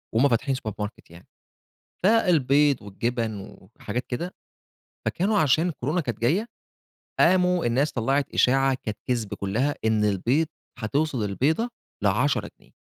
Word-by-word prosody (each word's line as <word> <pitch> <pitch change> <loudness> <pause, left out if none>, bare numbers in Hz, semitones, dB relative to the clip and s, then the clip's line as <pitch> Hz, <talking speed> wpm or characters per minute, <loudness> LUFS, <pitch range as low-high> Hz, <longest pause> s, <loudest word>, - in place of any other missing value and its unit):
وهُم 135 +5 +5
فاتحين 130 +3 +1
سوبر 110 -5 -5
ماركت 105 -3 -6
يعني، 85 +1 -15 0.8
فالبيض 150 - +3
والجبن 110 0 -3 0.2
وحاجات 120 +4 -3
كده، 170 +9 -4 0.7
فكانوا 200 +4 +1
عشان 155 +4 +3
كورونا 150 +4 -1
كانت 120 -7 -4
جايّة، 175 - +2 0.7
قاموا 180 -3 +4
الناس 135 +6 +1
طلّعت 135 +4 0
إشاعة 135 +1 +3
كانت 105 -2 -4
كِذب 115 -5 -1
كلّها 120 +9 -1
إن 110 -1 +2
البيض 120 - +1 0.3
هتوصل 135 +1 -1
البيضة 150 - 0 0.3
ل10 - - +1
جنيه. - - -24
130 Hz, 125 wpm, -25 LUFS, 110-155 Hz, 0.8 s, وهُم